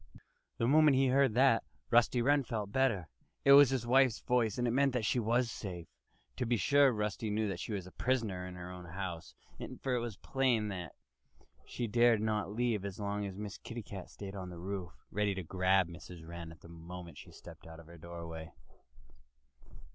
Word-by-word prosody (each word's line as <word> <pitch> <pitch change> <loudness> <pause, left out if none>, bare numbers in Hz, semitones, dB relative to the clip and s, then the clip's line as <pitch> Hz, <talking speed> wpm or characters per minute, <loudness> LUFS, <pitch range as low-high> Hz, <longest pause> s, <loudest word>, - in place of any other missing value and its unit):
The 115 - +1
moment 150 0 +5
he 135 -1 +3
heard 135 -3 +3
that, 130 -2 +4 0.3
Rusty 120 0 +4
Wren 140 +2 +3
felt 110 -5 -4
better. 115 -9 +1 0.4
It 140 - +7
was 140 -1 +9
his 130 -3 -1
wife's 130 -1 +4
voice 120 -4 +1
and 120 0 +1
it - - +1
meant 135 0 +3
that 120 -4 0
she 125 - +1
was 120 +1 +1
safe. 90 -7 -6 0.5
To 125 - -1
be 120 0 +2
sure, 140 +6 +5
Rusty 105 0 -2
knew 105 +1 0
that 90 -3 -4
she - - -5
was 100 -4 -3
a 90 - -11
prisoner 110 -8 -1
in 90 - -8
her 90 0 -8
own 90 -1 -9
house; 85 -1 -6 0.5
for 130 - 0
it 125 - +2
was 115 -4 -5
plain 125 -6 +1
that 90 -3 -6 0.7
she 120 - -3
dared 120 0 +4
not 105 -2 -1
leave 115 -2 0
it 100 -2 -5
so 105 - -6
long 100 0 -2
as 95 -1 -8
Miss 105 -1 -6
Kitty 115 -1 -7
Cat 95 -2 -8
stayed 100 -1 -8
on 95 -2 -6
the 90 - -9
roof, 90 0 -5 0.2
ready 105 -1 0
to 95 - -4
grab 95 +2 +2
Mrs. 85 -1 -11
Wren 85 -1 -7
the - - -14
moment 85 +1 -10
she - - -12
stepped - - -13
out 80 0 -11
of 85 - -13
her 85 +1 -14
doorway. 85 -1 -8
105 Hz, 205 wpm, -33 LUFS, 90-120 Hz, 0.7 s, was